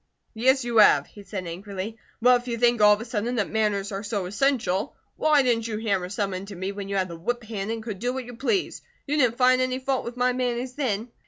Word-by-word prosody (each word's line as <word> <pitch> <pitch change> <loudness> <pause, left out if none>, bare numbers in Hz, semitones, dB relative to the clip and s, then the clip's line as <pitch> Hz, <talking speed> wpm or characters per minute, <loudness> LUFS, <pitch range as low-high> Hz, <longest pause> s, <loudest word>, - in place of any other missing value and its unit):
"Yes, 260 +4 +3
you 235 -1 -1
have," 150 -9 +6
he 205 - -14
said, 195 -2 -6
angrily. 195 +4 -6 0.3
"But 250 0 +6
if 245 - -16
you 235 -1 -2
think 240 -1 +3
all 210 0 +8
of 210 - -2
a - - -6
sudden 235 +1 -2
that 210 -4 -1
manners 210 -2 0
are 195 0 -3
so 205 -2 -3
essential, 205 -2 0 0.2
why 300 -3 +4
didn't 230 -3 +1
you 215 -2 -3
hammer 200 -5 -1
some 200 0 -2
into 195 +2 -6
me 190 +2 -3
when 200 -1 -7
you 200 - -2
had 190 -1 +1
the 170 - -8
whip 240 +9 -3
hand 210 -2 -5
and 225 0 -3
could 215 -4 -6
do 245 +2 -1
what 260 -1 -5
you 245 0 -9
pleased? 350 - -1 0.2
You 295 +1 -1
didn't 245 -5 +2
find 255 0 +4
any 255 0 0
fault 265 0 -1
with 240 +1 -7
my 250 0 +2
manners, 250 0 -2
then." 240 -5 -2
225 Hz, 250 wpm, -25 LUFS, 200-250 Hz, 0.3 s, all